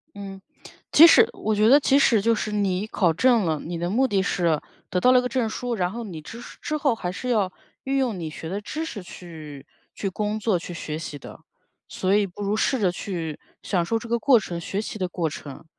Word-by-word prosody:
嗯， 195 Hz, -1 st, -8 dB, 0.5 s
即 325 Hz, +3 st, +10 dB
使 450 Hz, +7 st, +6 dB
我 215 Hz, 0 st, -1 dB
觉 215 Hz, +2 st, +4 dB
得 280 Hz, +3 st, +8 dB
即 275 Hz, -1 st, +3 dB
使 235 Hz, -6 st, +4 dB
就 230 Hz, +2 st, +3 dB
是 215 Hz, -, -3 dB
你 200 Hz, -2 st, 0 dB
考 180 Hz, -7 st, +1 dB
证 235 Hz, +3 st, +3 dB
了， 160 Hz, -2 st, 0 dB
你 170 Hz, +1 st, -5 dB
的 175 Hz, +1 st, -2 dB
目 255 Hz, +7 st, +2 dB
的 200 Hz, -5 st, +1 dB
是 170 Hz, -5 st, +1 dB, 0.3 s
得 180 Hz, -, 0 dB
到 250 Hz, +7 st, +5 dB
了 250 Hz, -, +6 dB
个 250 Hz, -, -3 dB
证 245 Hz, -2 st, 0 dB
书， 245 Hz, +2 st, -3 dB
然 180 Hz, -3 st, -1 dB
后 235 Hz, +3 st, -5 dB
你 175 Hz, -8 st, -7 dB
之 230 Hz, +10 st, -10 dB, 0.2 s
之 305 Hz, -, -2 dB
后 280 Hz, -4 st, +2 dB
还 180 Hz, -5 st, -4 dB
是 250 Hz, +7 st, -5 dB
要 205 Hz, -6 st, +1 dB, 0.3 s
运 270 Hz, +1 st, -1 dB
用 245 Hz, -8 st, 0 dB
你 160 Hz, -2 st, -4 dB
学 160 Hz, +1 st, -8 dB
的 195 Hz, +3 st, -3 dB
知 305 Hz, +10 st, -5 dB
识 245 Hz, -10 st, -6 dB
去 155 Hz, -6 st, -10 dB, 0.3 s
去 195 Hz, -, -2 dB
工 210 Hz, +3 st, -2 dB
作 210 Hz, -4 st, +1 dB
去 175 Hz, -, -8 dB
学 155 Hz, -2 st, -5 dB
习 155 Hz, -3 st, -6 dB
的。 -, -, -12 dB, 0.5 s
所 185 Hz, +1 st, -1 dB
以 210 Hz, -1 st, +3 dB
不 195 Hz, +2 st, -10 dB
如 205 Hz, +1 st, 0 dB
试 255 Hz, +4 st, +1 dB
着 195 Hz, -4 st, +3 dB
去 170 Hz, -5 st, -5 dB, 0.3 s
享 180 Hz, -4 st, 0 dB
受 225 Hz, +6 st, 0 dB
这 235 Hz, -, -9 dB
个 235 Hz, +1 st, +1 dB
过 245 Hz, 0 st, +5 dB
程 175 Hz, -4 st, -5 dB
学 195 Hz, +4 st, -3 dB
习 220 Hz, -, -6 dB
的 185 Hz, -, 0 dB
过 170 Hz, -2 st, -1 dB
程， 145 Hz, 0 st, -9 dB
200 Hz, 255 characters per minute, -24 LUFS, 175-235 Hz, 0.5 s, 即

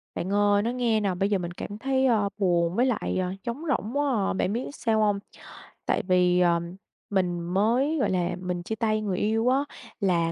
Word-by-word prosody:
Bạn 190 Hz, +3 st, -3 dB
ơi, 205 Hz, 0 st, +3 dB
nói 235 Hz, +3 st, -1 dB
nghe 235 Hz, -3 st, +1 dB
nè, 200 Hz, -3 st, 0 dB
bây 195 Hz, +3 st, 0 dB
giờ 205 Hz, -, +2 dB
mình 175 Hz, -2 st, -4 dB
cảm 205 Hz, +3 st, -7 dB
thấy, 265 Hz, +3 st, +1 dB
ơ, 215 Hz, -5 st, +2 dB
buồn 175 Hz, -3 st, +1 dB
với 245 Hz, -, +3 dB
lại, 245 Hz, -7 st, -1 dB
ờ, 180 Hz, 0 st, -2 dB
trống 240 Hz, +6 st, -4 dB
rỗng 245 Hz, 0 st, -1 dB
quá 260 Hz, -9 st, +1 dB
à. -, -, -1 dB
Bạn 190 Hz, +1 st, 0 dB
biết 240 Hz, +3 st, -2 dB
sao 225 Hz, -2 st, 0 dB
hông? 205 Hz, -2 st, +2 dB, 0.7 s
Tại -, -, 0 dB
vì, 180 Hz, -1 st, +3 dB
ờ, 170 Hz, -1 st, +3 dB, 0.5 s
mình 180 Hz, -3 st, 0 dB
mới, 225 Hz, -, +1 dB
gọi -, -, +1 dB
là, 180 Hz, -1 st, 0 dB
mình 180 Hz, -1 st, -3 dB
chia 220 Hz, -, -3 dB
tay 215 Hz, 0 st, 0 dB
người 195 Hz, -4 st, -2 dB
yêu 225 Hz, +3 st, +1 dB
á. 260 Hz, -, +3 dB, 0.4 s
Là 170 Hz, -4 st, +1 dB
205 Hz, 215 wpm, -26 LUFS, 180-230 Hz, 0.7 s, ơi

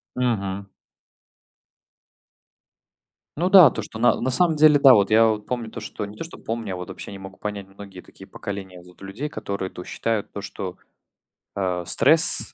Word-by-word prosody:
Мгм. 100 Hz, -6 st, -2 dB, 2.7 s
Ну 175 Hz, +5 st, 0 dB
да, 185 Hz, -7 st, +9 dB
то 110 Hz, -, -5 dB
что 110 Hz, +2 st, -8 dB
на 120 Hz, -, +3 dB
на 130 Hz, +1 st, -1 dB
самом 170 Hz, +3 st, +2 dB
деле, 150 Hz, -1 st, +5 dB
да, 135 Hz, -2 st, +8 dB
вот 100 Hz, -2 st, +3 dB
я, 115 Hz, +1 st, +6 dB
вот 105 Hz, -1 st, -2 dB
помню 120 Hz, -3 st, -4 dB
то -, -, -8 dB
что, 105 Hz, -, -6 dB
не 105 Hz, +1 st, -12 dB
то -, -, -5 dB
что 165 Hz, -, -10 dB
помню, 115 Hz, -3 st, -5 dB
а -, -, -4 dB
вот 90 Hz, +1 st, -8 dB
вообще 95 Hz, -, -8 dB
не 100 Hz, -, -9 dB
могу 95 Hz, -1 st, -11 dB
понять 105 Hz, -2 st, -6 dB
многие 95 Hz, -1 st, -12 dB
такие 95 Hz, -, -16 dB
поколения, 95 Hz, -3 st, -8 dB
вот, 90 Hz, 0 st, -19 dB
людей, 100 Hz, +10 st, -6 dB
которые 100 Hz, -8 st, -5 dB
то 90 Hz, -, -10 dB
считают, 115 Hz, +1 st, -3 dB
то 100 Hz, -, -7 dB
что, 95 Hz, -2 st, -7 dB, 0.8 s
э, 90 Hz, -2 st, -2 dB
стресс- 160 Hz, -, +4 dB
105 Hz, 180 wpm, -23 LUFS, 95-125 Hz, 2.7 s, да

